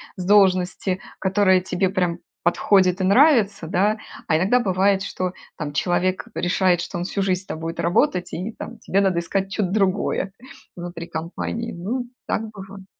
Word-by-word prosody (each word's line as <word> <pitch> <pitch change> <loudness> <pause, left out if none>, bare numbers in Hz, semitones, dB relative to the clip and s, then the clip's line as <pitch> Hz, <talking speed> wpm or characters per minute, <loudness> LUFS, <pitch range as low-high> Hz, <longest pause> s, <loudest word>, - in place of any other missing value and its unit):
с 180 - -5
должности, 185 -1 +3 0.2
которая 190 -1 +3
тебе 185 +1 0
прям 180 -3 0 0.3
подходит 185 +1 +3
и - - +1
нравится, 205 - +4
да, 200 +5 +2 0.3
а 155 - +3
иногда 200 +9 +3
бывает, 195 -1 +2
что, 185 -1 -3 0.2
там, 150 -2 -4
человек 185 +5 0
решает, 180 0 +2
что 175 +2 -4
он 175 - -2
всю 195 +2 -2
жизнь 185 -1 +1
с - - -22
тобой 165 -1 -5
будет - - -4
работать, 175 +1 +1
и, 200 +6 -4
там, 235 - -8
тебе 195 - +1
надо 190 -3 +2
искать 195 +3 -2
что-то 195 -2 -1
другое 195 -1 0 0.5
внутри 175 -1 -6
компании. 180 +8 -4
Ну, 230 +9 -3 0.2
так 220 0 -2
бывает. 195 -2 -11
185 Hz, 165 wpm, -22 LUFS, 175-200 Hz, 0.5 s, нравится